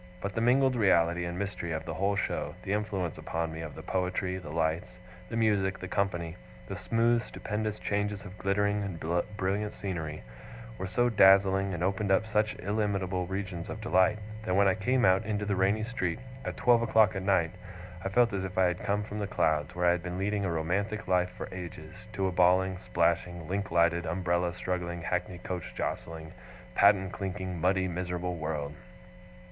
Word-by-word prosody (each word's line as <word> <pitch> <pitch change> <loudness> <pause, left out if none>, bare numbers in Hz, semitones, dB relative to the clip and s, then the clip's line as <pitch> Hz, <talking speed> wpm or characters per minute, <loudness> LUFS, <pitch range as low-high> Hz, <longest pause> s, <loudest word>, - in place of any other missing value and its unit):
But 100 +1 -4
the 115 - -1
mingled 130 +2 +4
reality 85 -5 +3
and 85 0 -4
mystery 95 -4 -3
of 80 0 -4
the 80 - -4
whole 100 +5 +1
show, 75 -5 -2
the 95 - -1
influence 100 -5 -2
upon 80 -1 -3
me 80 - -6
of 80 -2 -7
the 80 - -9
poetry, 90 0 -1
the 80 -5 -9
lights, 80 +3 -1 0.3
the 115 - -3
music, 100 -4 +2
the 95 - -6
company, 90 -4 -1 0.3
the - - -5
smooth 115 +1 +2
stupendous 105 0 -3
changes 105 -1 -2
of 90 0 -9
glittering 100 +1 +1
and 85 -3 -1
brilliant 100 +3 -1
scenery, 80 -8 -4 0.6
were 95 - -3
so 120 +6 +2
dazzling, 95 -2 +5
and 85 - -3
opened 95 +1 0
up 95 - +4
such 105 -1 +1
illimitable 95 -3 -1
regions 95 -3 -4
of - - -5
delight, 95 +5 +3 0.3
that 90 -3 0
when 100 0 +5
I 95 - +4
came 125 +5 +2
out 95 +2 +4
into 105 -1 -2
the 100 -1 0
rainy 100 +3 +2
street, 95 -8 -2 0.3
at - - -4
twelve 120 -1 +4
o'clock 110 -2 +4
at 95 - -2
night, 95 -4 +2 0.5
I - - -1
felt 115 +2 +3
as 95 -1 -1
if 95 -1 -6
I 95 - +5
had 90 0 -1
come 105 +1 0
from 105 0 -6
the 100 - -2
clouds, 75 -6 0
where 90 0 0
I 85 - +6
had 90 0 0
been 90 +1 -5
leading 100 +1 0
a 90 - 0
romantic 100 +7 -1
life 90 -1 +2
for - - -5
ages, 85 -4 -8 0.2
to 95 -2 -1
a 95 - +1
bawling, 90 +1 +3
splashing, 85 -1 0
link 100 +2 -2
lighted, 85 0 +2
umbrella 85 0 0
struggling, 85 -2 -3
hackney 90 0 -2
coach 90 0 -6
jostling, 80 -1 -4 0.4
patten 100 -2 +4
clinking, 95 -3 -4
muddy, 95 +1 +2
miserable 90 0 -3
world. 75 -2 -3
95 Hz, 190 wpm, -30 LUFS, 85-100 Hz, 0.6 s, I